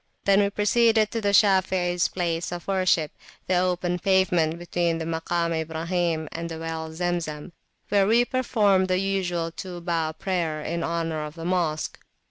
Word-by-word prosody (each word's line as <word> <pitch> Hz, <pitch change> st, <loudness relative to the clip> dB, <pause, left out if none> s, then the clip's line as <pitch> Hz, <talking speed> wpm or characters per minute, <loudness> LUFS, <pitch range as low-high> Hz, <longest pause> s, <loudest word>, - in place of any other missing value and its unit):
Then 200 Hz, 0 st, +5 dB
we 200 Hz, -1 st, +3 dB
proceeded 220 Hz, +1 st, +3 dB
to 230 Hz, -, -2 dB
the 205 Hz, -, +1 dB
Shafeis 190 Hz, -3 st, +3 dB
place 170 Hz, -2 st, -2 dB
of 175 Hz, -1 st, -6 dB
worshipthe 185 Hz, -5 st, +2 dB, 0.4 s
open 180 Hz, -1 st, +1 dB
pavement 175 Hz, -4 st, +2 dB
between 175 Hz, -1 st, -1 dB
the 165 Hz, -, -4 dB
Makam 165 Hz, +1 st, -1 dB
Ibrahim 165 Hz, 0 st, -1 dB
and 170 Hz, 0 st, -5 dB
the 165 Hz, -, -6 dB
well 160 Hz, 0 st, -4 dB
Zemzemwhere 175 Hz, +3 st, -2 dB
we 235 Hz, +3 st, +4 dB
performed 210 Hz, -7 st, +2 dB
the 185 Hz, 0 st, +1 dB
usual 180 Hz, -3 st, -1 dB
two 180 Hz, +1 st, -7 dB
bow 165 Hz, -2 st, -1 dB
prayer 165 Hz, -2 st, -2 dB
in 165 Hz, +2 st, -3 dB
honour 165 Hz, -2 st, -2 dB
of 150 Hz, +1 st, -7 dB
the 165 Hz, -1 st, -7 dB
Mosque. 170 Hz, -4 st, -1 dB
175 Hz, 150 wpm, -25 LUFS, 165-190 Hz, 0.4 s, Then